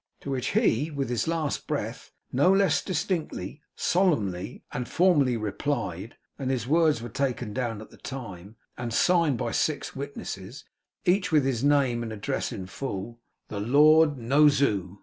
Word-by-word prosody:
To 140 Hz, -, -5 dB
which 130 Hz, -1 st, -2 dB
he, 155 Hz, -, +2 dB
with 140 Hz, -4 st, -3 dB
his 120 Hz, +2 st, -1 dB
last 160 Hz, -3 st, -2 dB
breath, -, -, -4 dB, 0.2 s
no 145 Hz, +9 st, +4 dB
less 195 Hz, 0 st, +3 dB
distinctly, 175 Hz, -4 st, -3 dB
solemnly, 115 Hz, -, 0 dB
and 125 Hz, 0 st, -4 dB
formally 150 Hz, -9 st, +3 dB
replied: 105 Hz, -, -3 dB, 0.2 s
and 130 Hz, -2 st, -2 dB
his 125 Hz, -3 st, -1 dB
words 155 Hz, -5 st, +3 dB
were -, -, -4 dB
taken 125 Hz, -3 st, -2 dB
down 115 Hz, -3 st, -3 dB
at -, -, -17 dB
the -, -, -16 dB
time, 105 Hz, -6 st, -8 dB, 0.2 s
and 120 Hz, -1 st, -3 dB
signed 170 Hz, -7 st, +3 dB
by 115 Hz, -, -2 dB
six 145 Hz, +2 st, -1 dB
witnesses, 135 Hz, -5 st, -7 dB, 0.4 s
each 185 Hz, +1 st, +2 dB
with 150 Hz, -4 st, +4 dB
his 130 Hz, -2 st, -1 dB
name 140 Hz, -5 st, +3 dB
and 115 Hz, -1 st, -4 dB
address 105 Hz, -2 st, -3 dB
in 95 Hz, -, -6 dB
full: 115 Hz, +2 st, -6 dB, 0.3 s
'The 105 Hz, -, -4 dB
Lord 150 Hz, +6 st, +5 dB
No 135 Hz, +6 st, +4 dB
Zoo. 100 Hz, -9 st, 0 dB
135 Hz, 160 wpm, -27 LUFS, 115-150 Hz, 0.4 s, Lord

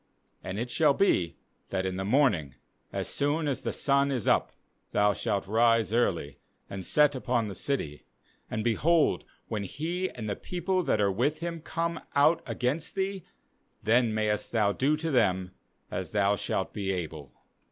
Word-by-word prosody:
^And 95 Hz, +1 st, -4 dB
it 120 Hz, +2 st, -3 dB
shall 145 Hz, +1 st, +4 dB
be, 90 Hz, -, +2 dB, 0.3 s
that 95 Hz, -1 st, -1 dB
in 95 Hz, -1 st, -2 dB
the 95 Hz, -, -2 dB
morning, 100 Hz, -, +2 dB, 0.4 s
as -, -, -3 dB
soon 145 Hz, +2 st, 0 dB
as 135 Hz, -4 st, -1 dB
the -, -, -2 dB
sun 140 Hz, 0 st, +2 dB
is 130 Hz, -6 st, -2 dB
up, -, -, +3 dB, 0.4 s
thou 105 Hz, 0 st, +4 dB
shalt 100 Hz, -1 st, -1 dB
rise 115 Hz, +1 st, +3 dB
early, 85 Hz, -, 0 dB, 0.3 s
and 95 Hz, -1 st, -6 dB
set 150 Hz, +8 st, +4 dB
upon 125 Hz, -4 st, 0 dB
the 100 Hz, -, -5 dB
city; 85 Hz, -, -3 dB, 0.4 s
and, 110 Hz, -, -2 dB
behold, 150 Hz, +8 st, +2 dB, 0.2 s
when 110 Hz, -2 st, -2 dB
he 170 Hz, -, -3 dB
and 115 Hz, -3 st, -7 dB
the 100 Hz, -, -1 dB
people 185 Hz, +1 st, -1 dB
that 135 Hz, -, +1 dB
are 100 Hz, -1 st, +3 dB
with 145 Hz, -, 0 dB
him 170 Hz, -1 st, -4 dB
corne 170 Hz, +1 st, -2 dB
out 145 Hz, +4 st, +4 dB
against 140 Hz, +6 st, -1 dB
thee, 195 Hz, -1 st, -2 dB, 0.6 s
then 115 Hz, +2 st, +3 dB
mayest 105 Hz, -1 st, -1 dB
thou 105 Hz, -3 st, +3 dB
do 140 Hz, +8 st, +1 dB
to 160 Hz, +1 st, -2 dB
them 95 Hz, -7 st, +2 dB, 0.4 s
as 95 Hz, +2 st, -4 dB
thou 100 Hz, -1 st, +3 dB
shalt 95 Hz, -1 st, -2 dB
be 100 Hz, -2 st, -2 dB
able.' 80 Hz, -7 st, -5 dB
115 Hz, 170 wpm, -28 LUFS, 100-150 Hz, 0.6 s, shall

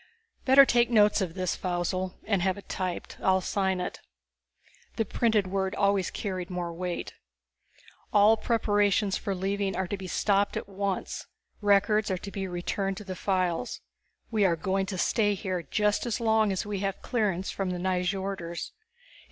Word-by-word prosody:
"Better 275 Hz, +1 st, +8 dB
take 240 Hz, -2 st, +3 dB
notes 210 Hz, -2 st, +4 dB
of 180 Hz, -3 st, -3 dB
this, 185 Hz, -2 st, -1 dB
Faussel, 185 Hz, +1 st, -2 dB
and 200 Hz, -4 st, +1 dB
have 190 Hz, +1 st, +1 dB
it 200 Hz, -, -11 dB
typed. 185 Hz, -2 st, -4 dB
I'll 190 Hz, 0 st, +3 dB
sign 190 Hz, 0 st, 0 dB
it." 180 Hz, -, -4 dB, 1.0 s
The 225 Hz, -, 0 dB
printed 220 Hz, -1 st, +2 dB
word 190 Hz, 0 st, -1 dB
always 200 Hz, -2 st, +2 dB
carried 185 Hz, -4 st, -4 dB
more 175 Hz, -2 st, -3 dB
weight. 180 Hz, +1 st, -4 dB, 1.0 s
"All 210 Hz, +1 st, +6 dB
preparations 205 Hz, -3 st, +2 dB
for 200 Hz, -3 st, -2 dB
leaving 195 Hz, +1 st, -1 dB
are 190 Hz, -, 0 dB
to 200 Hz, -, -3 dB
be 190 Hz, -1 st, -7 dB
stopped 200 Hz, +2 st, +1 dB
at -, -, -5 dB
once. 195 Hz, -1 st, -3 dB, 0.3 s
Records 205 Hz, +1 st, +3 dB
are 190 Hz, -, 0 dB
to 200 Hz, +2 st, -8 dB
be 195 Hz, -1 st, -3 dB
returned 190 Hz, +2 st, -2 dB
to -, -, -7 dB
the 190 Hz, -2 st, -6 dB
files. 185 Hz, -3 st, -1 dB, 0.5 s
We 215 Hz, -2 st, +2 dB
are 180 Hz, -4 st, +4 dB
going 190 Hz, +3 st, -1 dB
to 190 Hz, -1 st, -4 dB
stay 205 Hz, +3 st, +2 dB
here 185 Hz, -2 st, -3 dB
just 210 Hz, -, 0 dB
as 235 Hz, +1 st, -1 dB
long 220 Hz, -2 st, +3 dB
as 190 Hz, -, -2 dB
we 205 Hz, -1 st, -3 dB
have 195 Hz, 0 st, -3 dB
clearance 200 Hz, -7 st, 0 dB
from 195 Hz, -2 st, -2 dB
the 180 Hz, -, -2 dB
Nyjorders. 180 Hz, -1 st, -2 dB
195 Hz, 170 wpm, -28 LUFS, 185-205 Hz, 1.0 s, Better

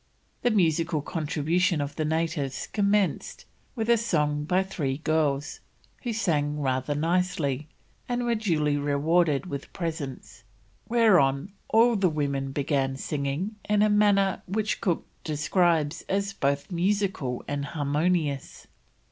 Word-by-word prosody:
The 245 Hz, -, +3 dB
musical 165 Hz, -6 st, +1 dB
contribution 160 Hz, +2 st, 0 dB
of 145 Hz, 0 st, -3 dB
the 155 Hz, -, -1 dB
natives 160 Hz, -4 st, -1 dB
commenced 205 Hz, -2 st, 0 dB, 0.3 s
with 225 Hz, -2 st, -2 dB
a 235 Hz, 0 st, +5 dB
song 150 Hz, -9 st, 0 dB
by 180 Hz, +4 st, +2 dB
three 145 Hz, -8 st, -3 dB
girls, 150 Hz, -2 st, 0 dB, 0.4 s
who 240 Hz, -, -2 dB
sang 150 Hz, -9 st, 0 dB
rather 130 Hz, +1 st, -1 dB
nicely, 155 Hz, -3 st, 0 dB, 0.4 s
and 245 Hz, 0 st, -1 dB
were 240 Hz, -, +2 dB
duly 160 Hz, -10 st, +1 dB
rewarded 145 Hz, +2 st, +2 dB
with 140 Hz, -6 st, -6 dB
presents, 160 Hz, -, -5 dB, 0.5 s
whereon 190 Hz, -, +3 dB, 0.2 s
all 230 Hz, +1 st, +5 dB
the 195 Hz, -3 st, +3 dB
women 140 Hz, -3 st, -2 dB
began 135 Hz, -1 st, 0 dB
singing 145 Hz, +9 st, -3 dB
in 210 Hz, 0 st, +4 dB
a 215 Hz, -, +4 dB
manner 200 Hz, -2 st, +3 dB
which 210 Hz, +3 st, -1 dB
Cook 175 Hz, -4 st, 0 dB, 0.2 s
describes 155 Hz, 0 st, +1 dB
as 200 Hz, +1 st, 0 dB
"both 140 Hz, 0 st, -1 dB
musical 180 Hz, -8 st, -1 dB
and 145 Hz, 0 st, -2 dB
harmonious." 145 Hz, 0 st, -1 dB
160 Hz, 125 wpm, -26 LUFS, 145-195 Hz, 0.5 s, a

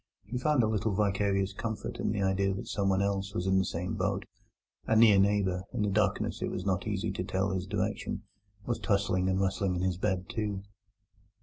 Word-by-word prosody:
He 120 Hz, +5 st, -3 dB
found 145 Hz, -2 st, +3 dB
a -, -, +3 dB
little 110 Hz, -1 st, 0 dB
vicarious 100 Hz, -1 st, +1 dB
comfort 110 Hz, +1 st, -4 dB
in -, -, 0 dB
the 100 Hz, -2 st, -1 dB
idea 95 Hz, 0 st, +1 dB
that 100 Hz, -, -5 dB
someone 95 Hz, -1 st, +1 dB
else 100 Hz, 0 st, -2 dB
was 90 Hz, -, -1 dB
in 95 Hz, 0 st, +3 dB
the -, -, +3 dB
same 90 Hz, +3 st, -3 dB
boat. 100 Hz, -1 st, -1 dB, 0.6 s
A 110 Hz, -, +3 dB
near 110 Hz, -3 st, +7 dB
neighbour 95 Hz, -2 st, +2 dB
(in 105 Hz, -, 0 dB
the 105 Hz, -, +1 dB
darkness 105 Hz, -1 st, 0 dB
it -, -, -1 dB
was 90 Hz, -, -4 dB
not 95 Hz, +1 st, 0 dB
easy 105 Hz, 0 st, -1 dB
to 95 Hz, -, -3 dB
tell 95 Hz, +1 st, -1 dB
his 95 Hz, -1 st, -2 dB
direction) -, -, -2 dB, 0.4 s
was 120 Hz, -, -1 dB
tossing 100 Hz, -3 st, +1 dB
and 95 Hz, 0 st, +1 dB
rustling 95 Hz, -1 st, 0 dB
in 90 Hz, -, -1 dB
his 95 Hz, -2 st, 0 dB
bed, 95 Hz, -2 st, -1 dB
too. 105 Hz, -4 st, -3 dB
100 Hz, 205 wpm, -30 LUFS, 95-105 Hz, 0.6 s, near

